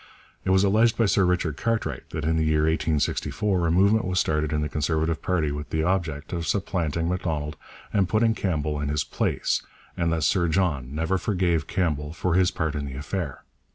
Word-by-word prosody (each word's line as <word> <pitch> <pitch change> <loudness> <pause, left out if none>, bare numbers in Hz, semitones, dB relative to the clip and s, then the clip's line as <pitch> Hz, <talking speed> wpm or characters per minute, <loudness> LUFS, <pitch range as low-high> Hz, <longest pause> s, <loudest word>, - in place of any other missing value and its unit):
It - - -2
was 95 +1 +4
alleged 110 +3 +3
by 115 - +3
Sir 100 -1 +3
Richard 85 -4 0
Cartwright 110 - -2
that - - -4
in 80 +1 +2
the 80 - +2
year 80 -1 +2
1864 80 +4 0
a - - +1
movement 100 +5 +4
was 90 0 0
started 75 -1 0
in 75 - 0
the 75 - 0
Conservative 80 +2 -1
party 80 -5 0
with 75 0 -5
the 80 0 0
object 80 -5 -1
of 85 -1 -3
supplanting 85 -5 -1
Macdonald 80 -4 -2 0.4
and 95 -3 +2
putting 110 +1 +3
Campbell 75 -8 -1
in 75 - -2
his 75 0 0
place, - - -1 0.3
and 85 -1 0
that 80 -2 0
Sir 90 -4 +2
John 75 -6 0
never 80 +4 0
forgave 90 -5 0
Campbell 75 -5 -1
for 90 +1 -1
his 90 0 +4
part 80 -4 -2
in 75 -2 -3
this 70 -2 -6
affair. 75 -1 -4
80 Hz, 195 wpm, -25 LUFS, 75-95 Hz, 0.4 s, was